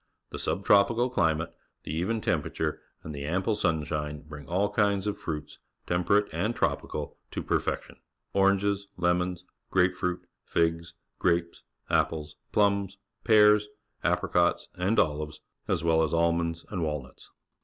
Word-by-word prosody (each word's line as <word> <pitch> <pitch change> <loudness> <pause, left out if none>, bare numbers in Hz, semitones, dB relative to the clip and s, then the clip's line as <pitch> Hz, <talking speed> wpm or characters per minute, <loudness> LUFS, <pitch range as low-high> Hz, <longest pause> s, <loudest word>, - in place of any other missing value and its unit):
The - - -5
sub 100 - -2
tropical 115 +5 +4
chmate, 80 -6 +1 0.3
the - - -5
even 110 +8 -1
temperature, - - -1 0.2
and 80 - -6
the 70 -1 -5
ample 95 +7 0
sunshine 75 -5 -1
bring 75 -2 -10
all 95 +4 +1
kinds 100 -2 +2
of 105 -1 -1
fruits, 75 -3 -5 0.3
temperate 90 +4 +2
and 105 +9 0
tropical, - - -2
to - - -4
perfection - - -2 0.2
— - - -52
orangesJ|ejiions, 95 -3 +1 0.3
grapefruit, 90 -1 +1 0.2
figs, 85 0 0 0.2
grapes, 85 -1 +1 0.3
apples, 75 -2 0 0.2
plums, 100 -1 +2 0.3
pears, 105 -1 +6 0.4
apxicois, 85 0 +1
and 95 +5 0
ohves, 75 -1 +1 0.3
as 80 - 0
well 80 -1 +4
as 80 0 +1
almonds 85 0 +1
and 95 -4 -2
walnuts. 75 -4 -4
90 Hz, 130 wpm, -28 LUFS, 80-100 Hz, 0.4 s, pears